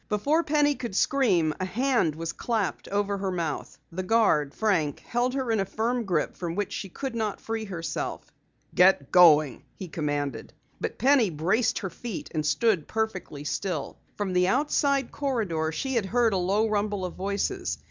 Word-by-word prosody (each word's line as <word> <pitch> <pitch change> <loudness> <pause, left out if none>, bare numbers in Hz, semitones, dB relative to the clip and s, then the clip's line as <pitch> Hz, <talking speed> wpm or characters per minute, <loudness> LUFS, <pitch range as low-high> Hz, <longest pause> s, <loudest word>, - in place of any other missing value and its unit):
Before 285 +11 +2
Penny 295 -1 +3
could 235 -7 -6
scream, 190 - +2
a 185 - -1
hand 230 - +1
was 165 +1 -4
clapped 220 -6 -2
over 200 0 -1
her 195 0 -1
mouth. 170 -5 -3
The 180 +3 -3
guard, 185 -8 +2
Frank, 175 -10 0
held 245 +2 -1
her 260 -4 -1
in 220 - +2
a 195 - +1
firm 230 +4 -1
grip 185 -3 -1
from 170 -2 -4
which 205 -1 -2
she 195 - -5
could 265 +7 -5
not 220 -3 -2
free 225 -1 -4
herself. 165 -6 -5 0.4
"Get 180 -6 +4
going!" 155 -6 +6
he 190 - -7
commanded. 145 -7 -3 0.3
But - - -4
Penny 255 -3 +4
braced 175 +9 +1
her 190 -3 -4
feet 230 +1 -7
and 155 -2 -1
stood 190 0 +1
perfectly 215 -9 -3
still. 160 -1 -3 0.2
From 200 -3 -2
the 180 0 +3
outside 280 +2 +1
corridor 205 - -1
she 265 - -3
had 225 -6 0
heard 230 +1 +2
a - - +1
low 195 +5 +1
rumble 205 -2 -1
of 180 - -5
voices. 200 - -2
200 Hz, 175 wpm, -27 LUFS, 170-235 Hz, 0.4 s, going